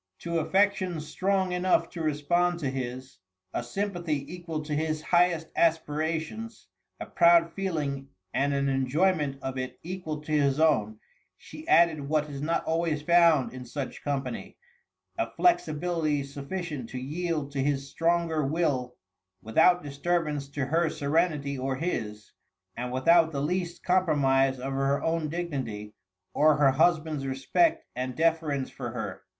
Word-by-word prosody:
To 170 -1 -1
affections 185 -1 +1
strong 190 +3 0
enough 180 +1 +2
to 170 - -6
respond 170 +4 +1
to 135 -3 -1
his, 130 -4 -6 0.3
a - - -1
sympathy 175 -7 -3
equal 165 -3 -5
to 150 0 -4
his 155 +1 -1
highest 175 -2 +2
aspirations, 160 +6 -1 0.3
a - - -5
proud 170 -1 +4
feeling 150 -8 -3 0.3
and 140 +1 +1
an 140 0 0
enjoyment 140 +2 +1
of 135 -1 -3
it 130 0 -5
equal 170 -3 -5
to 150 - -8
his 145 -2 +2
own, 110 -10 +2 0.4
she 310 +1 -12
added 160 - +4
what 155 -1 +1
is 140 -1 -6
not 165 +3 0
always 160 -2 -1
found 170 -5 +4
in 130 0 -7
such 130 +2 -6
company, 135 -3 -4 0.6
a - - 0
flexibility 160 - +1
sufficient 140 -1 -5
to 130 - -6
yield 150 +2 -3
to 140 -1 -2
his 140 0 -1
stronger 165 +1 0
will 135 -5 -1 0.5
without 175 +11 +4
disturbance 150 0 -1
to 140 -1 -2
her 165 +4 +1
serenity 145 -2 0
or 135 +1 -1
his, 105 -9 -4 0.4
and 125 +1 -4
without 160 +6 +4
the 140 - -3
least 175 +3 -2
compromise 140 -7 +2
of 135 +2 -4
her 135 +1 +1
own 165 -2 0
dignity 130 -11 -4 0.4
or 155 0 +4
her 140 -2 +5
husband's 155 -1 +1
respect 320 - +1
and 125 0 -3
deference 160 -4 0
for - - -6
her. - - -5
155 Hz, 145 wpm, -28 LUFS, 135-170 Hz, 0.6 s, her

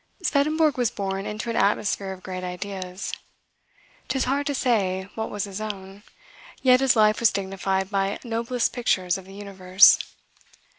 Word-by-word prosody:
Swedenborg 305 -2 +2
was 245 -3 +2
born 195 -1 -4
into 215 +2 -4
an - - -4
atmosphere 200 -1 +1
of 185 -1 -9
great 185 0 -6
ideas. 185 0 -5 0.9
'Tis 265 - 0
hard 280 +3 -1
to 285 - -1
say 190 -8 0
what 220 0 -4
was 205 -1 -3
his 200 0 -6
own: 195 -2 -7 0.6
yet 255 -1 +6
his 265 -2 +3
life 215 -1 +4
was 235 - +4
dignified 190 0 -2
by 195 0 0
noblest 235 +1 -1
pictures 185 -7 +1
of 190 - -13
the 195 - -13
universe. 190 -2 +5
205 Hz, 155 wpm, -24 LUFS, 190-235 Hz, 0.9 s, yet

